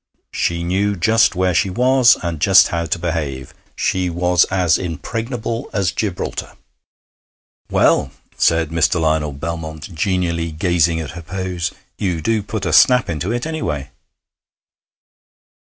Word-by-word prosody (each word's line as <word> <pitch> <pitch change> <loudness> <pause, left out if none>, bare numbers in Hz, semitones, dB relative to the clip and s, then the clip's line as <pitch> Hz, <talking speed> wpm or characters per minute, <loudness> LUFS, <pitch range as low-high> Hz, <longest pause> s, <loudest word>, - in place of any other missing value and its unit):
She 85 0 -1
knew 100 +4 0
just 110 +4 +3
where 90 0 +1
she 95 - +2
was, 125 +4 +4
and 85 -3 -3
just 95 +4 +6
how 85 -1 -2
to 80 - -1
behave. 75 -6 -4 0.2
She 90 -1 0
was 90 +1 +2
as 90 -4 +1
impregnable 115 - -4
as 100 -3 0
Gibraltar. 100 -5 -4 1.2
'Well,' - - +3 0.3
said 80 -1 +2
Mr. 85 +1 +2
Lionel 80 -2 0
Belmont, 80 +2 -6
genially 85 -1 -1
gazing 85 0 +1
at 80 -2 -5
her 85 - -8
pose, 90 0 -4 0.3
'you 90 -4 -1
do 110 +7 0
put 105 0 -5
snap 125 0 +5
into 85 +6 -3
it, 120 +3 -2
any 160 0 -4
way.' - - -3
90 Hz, 135 wpm, -19 LUFS, 80-100 Hz, 1.2 s, just